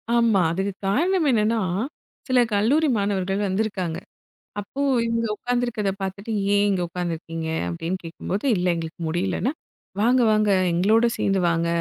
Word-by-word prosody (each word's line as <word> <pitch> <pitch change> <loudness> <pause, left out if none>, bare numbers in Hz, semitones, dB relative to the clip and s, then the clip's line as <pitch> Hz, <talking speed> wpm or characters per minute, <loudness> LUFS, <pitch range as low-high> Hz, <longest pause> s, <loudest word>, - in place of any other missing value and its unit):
ஆமா, 230 -5 +4
அதுக்கு 190 +4 -1 0.2
காரணம் 335 - +2
என்னன்னா, 225 -1 +2 0.7
சில 255 -2 +3
கல்லூரி 260 +10 +3
மாணவர்கள் 195 -1 -1
வந்து 190 +3 0
இருக்காங்க. 185 -6 -3 0.6
அப்போ, 205 +7 -5 0.2
இவங்க 230 0 0
உக்காந்து 245 +2 -1
இருக்கிறதை 215 -5 -1
பார்த்துட்டு, 195 +3 -5 0.2
"ஏன் 205 0 +4
இங்க 190 -2 0
உக்காந்து 175 0 -3
இருக்கீங்க." 165 0 -6 0.2
அப்படின்னு 165 - -3
கேட்கும்போது, 180 +6 -4
"இல்ல 180 +1 0
எங்களுக்கு 165 0 -6
முடியலன்னா 180 +9 -1 0.5
வாங்க 245 +3 +4
வாங்க 215 -1 +2 0.2
எங்களோட 210 +7 +3
சேர்ந்து 195 -1 +1
வாங்க," 165 0 0
200 Hz, 140 wpm, -23 LUFS, 180-230 Hz, 0.7 s, ஆமா